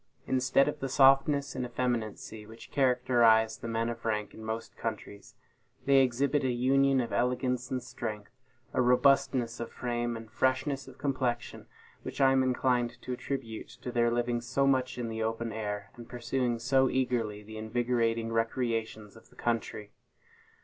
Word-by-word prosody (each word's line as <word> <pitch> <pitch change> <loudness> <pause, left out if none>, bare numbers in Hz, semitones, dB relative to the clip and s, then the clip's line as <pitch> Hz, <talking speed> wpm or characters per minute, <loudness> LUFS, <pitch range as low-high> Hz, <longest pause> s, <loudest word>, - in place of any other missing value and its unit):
Instead 130 +1 +3
of 150 0 -3
the 135 - -3
softness 135 +1 +4
and 130 - -3
effeminacy 120 -3 -3
which 115 +1 -13
characterize 120 -4 +3
the - - -6
men 115 0 -1
of 120 -1 -5
rank 105 -2 -2
in 110 - -11
most 110 +1 -5
countries, 105 -2 -6 0.5
they 140 0 +5
exhibit 135 +3 +1
a 130 - +1
union 135 +2 +3
of 120 - -2
elegance 125 0 0
and 130 -2 -2
strength, 110 -5 -6 0.4
a - - +2
robustness 125 -1 +3
of 115 - -5
frame 120 -1 -2
and 110 -1 -11
freshness 130 +3 0
of 130 - -13
complexion, 125 -4 -2 0.3
which - - -7
I 135 -1 +5
am 135 0 +4
inclined 125 -2 +1
to 125 - -4
attribute 125 -3 -5
to 125 - -4
their 120 -1 +2
living 120 0 0
so 130 +3 0
much 130 -2 +1
in 120 -1 -3
the 110 0 -4
open 115 +1 -2
air, 105 -1 -4
and 120 -1 -11
pursuing 125 0 -1
so 130 +2 +2
eagerly 115 -5 -1
the 110 +1 -10
invigorating 115 0 0
recreations 115 -2 -2
of 110 - -17
the - - -22
country. 115 -3 -3
120 Hz, 165 wpm, -30 LUFS, 115-130 Hz, 0.5 s, they